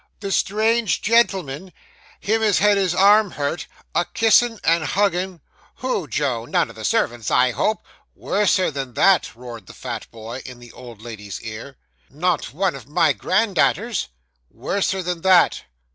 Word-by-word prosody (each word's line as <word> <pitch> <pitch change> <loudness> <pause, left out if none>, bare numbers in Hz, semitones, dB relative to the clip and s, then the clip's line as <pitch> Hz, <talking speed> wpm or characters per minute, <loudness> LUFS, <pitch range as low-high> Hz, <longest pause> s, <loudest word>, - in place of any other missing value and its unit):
'The 200 -1 -5
strange 220 +2 +1
gentleman 190 -8 +1 0.5
him 220 +2 0
as 210 -3 +3
had 210 0 +4
his 190 -3 0
arm 205 +2 +5
hurt 145 +1 -4 0.3
a 175 - +2
kissin' 225 +2 +2
and 165 0 +2
huggin' 185 -1 -1 0.2
' - - -32
'Who, 255 -10 -3
Joe? 125 -3 -2
None - - 0
of - - -17
the - - -9
servants, 115 -3 0
I 125 0 +3
hope.' 175 - -1 0.3
Worser 200 -4 +1
than 135 -4 -6
that,' 195 -11 +3
roared 115 -5 -10
the - - -12
fat 120 -4 -6
boy, 115 +3 -8
in 125 -2 -10
the 120 -1 -14
old 120 -4 -12
lady's 105 -4 -8
ear. 115 +4 -8 0.3
'Not 170 +3 -1
one 185 +3 0
of 130 -3 -11
my 155 0 +2
grandda'aters?' 200 - 0 0.4
'Worser 190 -1 -2
than 175 -1 -3
that. 185 -1 +4
175 Hz, 160 wpm, -21 LUFS, 125-200 Hz, 0.5 s, arm